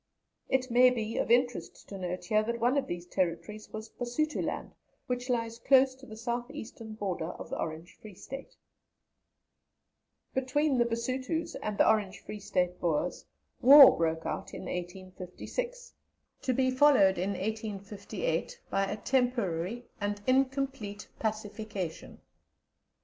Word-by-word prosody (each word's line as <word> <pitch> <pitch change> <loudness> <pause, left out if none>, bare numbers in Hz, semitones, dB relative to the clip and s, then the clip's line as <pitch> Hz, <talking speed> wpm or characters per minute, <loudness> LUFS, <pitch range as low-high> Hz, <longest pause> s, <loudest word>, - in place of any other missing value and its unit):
" - - -54
It 260 -1 +1
maybe 240 -2 +4
of - - 0
interest 245 0 +1
to 200 - -7
note 180 0 -4
here 215 +3 +3
that 235 +2 -2
one 245 +4 +3
of 280 - +1
these 175 0 -5
territories 190 +4 -2
was 220 0 -6
Basutoland, 250 +7 -2 0.3
which 250 +1 -3
lies 230 -1 -1
close 265 0 +5
to 265 +1 -15
the 220 -1 -9
South 240 +2 -3
Eastern 230 -6 -8
border 185 -6 -3
of - - -10
the - - -3
Orange 160 +2 -5
Free 210 -3 -11
State. 270 +8 -9 1.8
Between 265 +1 +1
the 240 - +4
Basutos 255 +8 -2
and 210 -1 -3
the - - +5
Orange 205 -3 +2
Free 210 - -8
State 180 -3 -1
Boers 170 0 -1 0.4
war 275 +2 +10
broke 160 0 0
out - - -4
in - - -7
1856, 185 - -6 0.5
to 265 - 0
be 260 +1 +2
followed 255 -9 +5
in 190 +3 0
1858 215 - -3
by 195 0 +2
a 205 +2 -3
temporary 235 -4 0 0.2
and 205 0 -1
incomplete 260 -5 0
pacification. 210 -5 -4
220 Hz, 140 wpm, -30 LUFS, 195-255 Hz, 1.8 s, war